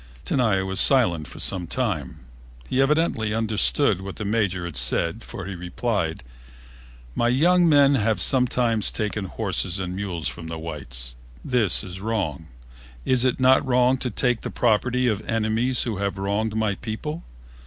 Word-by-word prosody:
Tenaya 110 Hz, -7 st, +1 dB
was 95 Hz, 0 st, -1 dB
silent 90 Hz, -, +3 dB
for -, -, -12 dB
some 90 Hz, -3 st, -2 dB
time. 100 Hz, -, -3 dB, 0.5 s
He 130 Hz, -, +1 dB
evidently 135 Hz, -7 st, +1 dB
understood 110 Hz, 0 st, +2 dB
what 95 Hz, 0 st, -7 dB
the 105 Hz, -, -6 dB
Major 100 Hz, -4 st, -1 dB
had 85 Hz, -4 st, -7 dB
said, 85 Hz, -, +2 dB
for 95 Hz, -, -8 dB
he 95 Hz, -, -6 dB
replied, 90 Hz, -, -3 dB, 0.9 s
"My 120 Hz, -, 0 dB
young 170 Hz, +7 st, +3 dB
men 140 Hz, -2 st, +5 dB
have 110 Hz, -5 st, +1 dB
sometimes 120 Hz, -2 st, +3 dB
taken 105 Hz, -2 st, -3 dB
horses 95 Hz, -3 st, -2 dB
and 90 Hz, -1 st, -4 dB
mules 95 Hz, -5 st, -3 dB
from 80 Hz, -1 st, -7 dB
the 80 Hz, 0 st, -6 dB
whites. 65 Hz, -7 st, -5 dB, 0.3 s
This 120 Hz, -9 st, +3 dB
was 95 Hz, -1 st, -8 dB
wrong. 95 Hz, -9 st, -3 dB, 0.6 s
It -, -, -1 dB
is 130 Hz, -1 st, 0 dB
not 130 Hz, +1 st, +4 dB
wrong 125 Hz, 0 st, +2 dB
to 125 Hz, -, -3 dB
take 125 Hz, +1 st, -1 dB
the -, -, -5 dB
property 125 Hz, +2 st, +1 dB
of 105 Hz, -3 st, 0 dB
enemies 115 Hz, +3 st, +1 dB
who 115 Hz, -5 st, -3 dB
have 100 Hz, -1 st, -3 dB
wronged 100 Hz, +3 st, -2 dB
my 110 Hz, -2 st, 0 dB
people. 120 Hz, +11 st, -6 dB
110 Hz, 160 wpm, -23 LUFS, 95-125 Hz, 0.9 s, men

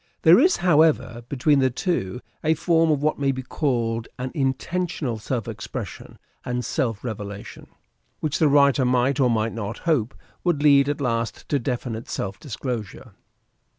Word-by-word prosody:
There -, -, +8 dB
is, 365 Hz, 0 st, +4 dB
however, 155 Hz, -8 st, +2 dB
between 140 Hz, +1 st, +2 dB
the 130 Hz, -1 st, +3 dB
two 125 Hz, -, -2 dB, 0.2 s
a 160 Hz, +1 st, +3 dB
form 165 Hz, 0 st, +2 dB
of 145 Hz, -2 st, +1 dB
what 155 Hz, -1 st, +1 dB
may 140 Hz, -1 st, +2 dB
be 130 Hz, 0 st, -5 dB
called 115 Hz, -5 st, -1 dB
an 125 Hz, +1 st, -4 dB
intentional 140 Hz, -2 st, -2 dB
self 115 Hz, 0 st, -3 dB
expression -, -, -7 dB, 0.3 s
and 125 Hz, 0 st, -3 dB
self 115 Hz, -5 st, -2 dB
revelation, 100 Hz, -4 st, -7 dB, 0.5 s
which 155 Hz, -2 st, -1 dB
the 155 Hz, -, +5 dB
writer 140 Hz, -1 st, +4 dB
might, 125 Hz, +2 st, +2 dB
or 130 Hz, -2 st, +4 dB
might 115 Hz, -1 st, 0 dB
not, 110 Hz, -1 st, -4 dB
hope 135 Hz, -8 st, +1 dB, 0.3 s
would 170 Hz, -5 st, +1 dB
lead 140 Hz, -1 st, +5 dB
at 145 Hz, 0 st, -2 dB
last 115 Hz, -3 st, -2 dB
to 145 Hz, -, +2 dB
definite 120 Hz, -2 st, -4 dB
self 95 Hz, 0 st, -4 dB
dis 130 Hz, -8 st, -7 dB
closure. 115 Hz, -7 st, -5 dB
130 Hz, 160 wpm, -24 LUFS, 115-150 Hz, 0.5 s, There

